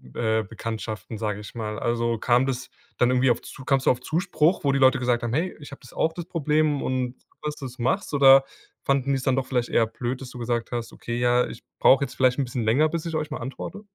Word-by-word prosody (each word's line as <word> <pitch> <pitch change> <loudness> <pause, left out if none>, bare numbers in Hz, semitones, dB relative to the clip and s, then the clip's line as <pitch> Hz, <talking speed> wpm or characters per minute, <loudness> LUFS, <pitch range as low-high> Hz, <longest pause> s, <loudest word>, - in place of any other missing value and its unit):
äh, 110 -1 +1
Bekanntschaften, 110 +1 -6
sage 105 -1 -3
ich 105 - -11
mal? 105 -2 -4
Also 115 -1 0
kam 125 +3 +3
das 130 -2 -3 0.3
dann 125 - +3
irgendwie 130 0 +3
auf - - -1
Zu 130 - -11
kamst 135 -2 +1
du - - +6
auf 120 - -1
Zuspruch, 165 +3 +1
wo 140 - +3
die 135 - +1
Leute 130 -1 +5
gesagt 120 -1 0
haben: 120 -1 -2
„Hey, 170 +6 0
ich 145 -1 -11
habe 140 - -10
das 125 - -14
auch, 160 - 0
das 175 - -5
Problem, 155 -3 +1
und 130 -1 -2
gut 150 - -9
dass 150 - -3
du 135 - -7
es 130 0 -9
machst“ 130 +9 -1
oder 135 -1 +7 0.4
fanden 140 -1 +1
die 135 - +2
es 130 - -6
dann 130 -1 +2
doch 135 -1 -1
vielleicht 125 -2 -1
eher 115 - +2
blöd, 120 +3 -4
dass 130 - -7
du 125 - -10
gesagt 120 -1 -2
hast: 120 -2 -4
„Okay, 120 0 -5
ja, 125 0 +3
ich - - -10 0.2
brauche 135 +1 +5
jetzt - - -11
vielleicht 130 0 +2
'n 135 - +1
bisschen 125 -1 -3
länger, 125 +8 +3
bis 165 +1 -4
ich 165 -1 -3
euch 155 -1 -2
mal 150 - -5
antworte“? 135 +11 -6
130 Hz, 260 wpm, -25 LUFS, 120-140 Hz, 0.4 s, oder